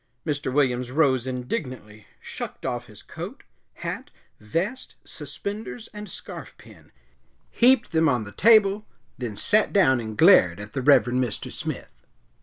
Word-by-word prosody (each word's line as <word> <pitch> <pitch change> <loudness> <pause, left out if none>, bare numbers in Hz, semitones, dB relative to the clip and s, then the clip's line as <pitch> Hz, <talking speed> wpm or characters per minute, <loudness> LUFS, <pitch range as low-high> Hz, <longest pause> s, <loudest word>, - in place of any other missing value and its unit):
Mr. 145 -3 -2
Williams 125 -3 +1
rose 130 -3 +2
indignantly, 125 - -5
shucked - - -7
off - - -3
his - - -14
coat, - - -8 0.4
hat, - - -4 0.3
vest, 175 - -3
suspenders 215 +3 -7
and 210 0 -8
scarfpin, - - -11 0.6
heaped 245 0 +4
them 160 -1 +3
on 125 -4 +1
the 105 - -9
table, 215 - +5
and 210 - -16 0.4
then 120 -5 -4
sat 215 0 +3
down 130 -11 +4
and 110 -2 -6
glared 105 - +6
at 105 +1 -9
the 135 - -2
Reverend 130 -2 +4
Mr. 120 -5 -4
Smith. - - -6
130 Hz, 140 wpm, -25 LUFS, 120-200 Hz, 0.6 s, glared